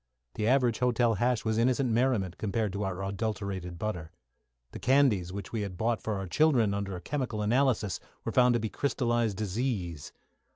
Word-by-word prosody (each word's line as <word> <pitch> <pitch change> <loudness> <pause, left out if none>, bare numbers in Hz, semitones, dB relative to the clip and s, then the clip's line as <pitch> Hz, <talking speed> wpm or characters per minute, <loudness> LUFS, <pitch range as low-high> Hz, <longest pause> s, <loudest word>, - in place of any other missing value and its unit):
The 110 - -1
average 125 -3 +3
hotel 120 -2 +2
hash 120 +3 0
was 110 0 +1
innocent 125 +1 +2
merriment 110 -7 +1
compared 105 -1 -1
to 100 - -3
our 95 -1 -3
adulterated 95 -3 -3
butter. 85 -6 -4 0.6
The - - -8
candies, 125 -10 +3
which 100 -1 -6
we 105 -3 -1
bought 110 +5 -1
for 110 - -2
our 95 0 -3
children, 120 - +3
under 100 -2 -3
chemical 125 -7 -2
analysis, 115 -4 +1 0.3
were - - -1
found 125 -1 +5
to - - +2
be 110 - -2
crystallised 120 -6 0
disease. 100 - -3
110 Hz, 165 wpm, -29 LUFS, 95-125 Hz, 0.6 s, found